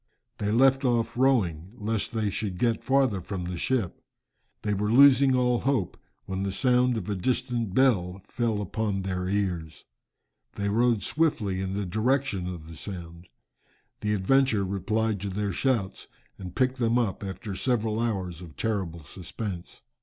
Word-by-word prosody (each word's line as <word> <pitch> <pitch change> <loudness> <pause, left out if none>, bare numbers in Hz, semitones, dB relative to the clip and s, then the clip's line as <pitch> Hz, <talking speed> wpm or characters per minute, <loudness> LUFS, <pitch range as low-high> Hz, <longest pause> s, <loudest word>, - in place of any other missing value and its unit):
They 105 0 0
left 135 +4 +4
off 115 -2 +1
rowing, 100 -9 +1
lest 110 -1 -2
they 110 -3 -1
should 100 -3 -3
get 115 +2 +1
farther 130 -8 +2
from 95 0 -5
the 90 0 -4
ship. 120 -9 -1 0.6
They 105 -1 0
were 105 +1 0
losing 135 +1 +7
all 125 -1 +2
hope 130 -9 0 0.3
when 95 0 -3
the 100 0 -1
sound 125 +2 +3
of 95 - -5
a 105 - -1
distant 120 0 -1
bell 95 -9 +3
fell 110 -3 -1
upon 100 0 -2
their 90 -1 -2
ears. 90 -6 -2 0.7
They 100 0 -1
rowed 115 0 +2
swiftly 130 -11 0
in 95 0 -3
the 100 0 -2
direction 110 0 0
of 80 -3 -9
the 80 - -10
sound. 85 0 -8 0.7
The 105 0 0
Adventure 110 0 +3
replied 105 +3 -1
to 100 +1 -4
their 100 +1 -2
shouts 115 -3 -1 0.3
and 90 -2 -8
picked 130 0 +1
them 115 0 +2
up 110 -5 -1
after 95 +1 -5
several 110 -1 0
hours 95 -7 -2
of 85 -4 -11
terrible 95 -7 -2
suspense. 90 +2 -7
105 Hz, 160 wpm, -27 LUFS, 95-120 Hz, 0.7 s, losing